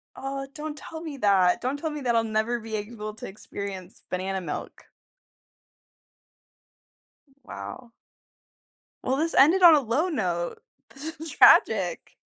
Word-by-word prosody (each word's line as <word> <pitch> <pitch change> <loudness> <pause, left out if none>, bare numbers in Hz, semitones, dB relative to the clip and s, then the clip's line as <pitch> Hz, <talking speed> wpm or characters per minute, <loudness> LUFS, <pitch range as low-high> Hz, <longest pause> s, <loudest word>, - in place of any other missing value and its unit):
Oh, 275 0 -5
don't 300 0 -6
tell 320 +1 -9
me 310 -4 -7
that. 195 -6 +3
Don't 260 +3 -2
tell 315 +2 -3
me 300 -1 -6
that 240 -3 +1
I'll 230 - +3
never 220 +2 -1
be 220 -1 -6
able 215 0 -6
to - - -7
experience 195 -2 -8
banana 190 +1 -2
milk. 165 -4 -7 2.6
Wow. 245 -2 -9 1.1
Well, 260 - 0
this 325 +3 0
ended 330 +8 +5
on 335 -2 +10
a - - +4
low 275 +8 0
note. 175 - -2 0.3
This 305 +4 -7
is 320 +1 -6
tragic. - - +4
240 Hz, 135 wpm, -26 LUFS, 205-300 Hz, 2.6 s, on